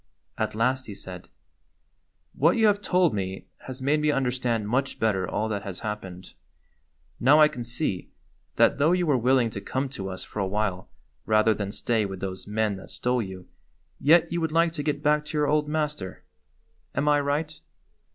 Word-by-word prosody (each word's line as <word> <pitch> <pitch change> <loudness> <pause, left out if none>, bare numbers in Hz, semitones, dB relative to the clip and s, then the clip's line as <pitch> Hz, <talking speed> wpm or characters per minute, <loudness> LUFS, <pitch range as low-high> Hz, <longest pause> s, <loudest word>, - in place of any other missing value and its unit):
At 110 -1 -2
last 130 +4 0
he 105 - -7
said: 90 -2 -9 1.0
"What 165 - +3
you 220 - +4
have 205 -1 +3
told 180 -4 +2
me 95 -2 -4 0.2
has 130 0 -6
made 150 +3 +2
me 150 - +2
under 135 -4 +1
stand 120 -4 -1
much 130 +4 0
better 95 -5 0
all 110 - -1
that 100 -2 -2
has 95 -3 -7
happened. 95 -5 -6 0.9
Now 145 +5 +6
I 155 - +8
can 125 -5 -6
see 120 - -3 0.5
that, - - +4
though 155 +5 +4
you 180 -1 +1
were 150 -4 +3
willing 125 -1 +3
to 100 - -6
come 130 +5 -2
to 100 -7 -5
us 95 0 -5
for - - -7
a 95 - 0
while 95 -2 -2 0.4
rather 110 0 +4
than 100 -2 -4
stay 110 -1 0
with 95 -1 -7
those 95 -1 -5
men 105 -1 0
that 95 - -12
stole 125 0 0
you, 95 -3 -8 0.5
yet 160 +3 +5
you 170 0 -1
would 160 -1 -1
like 165 +1 +3
to 160 -2 -4
get 145 0 -2
back 150 0 +3
to 150 - -4
your 150 - +3
old 150 0 +1
master. 150 -11 -3 0.7
Am 140 +2 0
I 145 0 +5
right?" 150 +2 -2
125 Hz, 195 wpm, -26 LUFS, 105-150 Hz, 1.0 s, I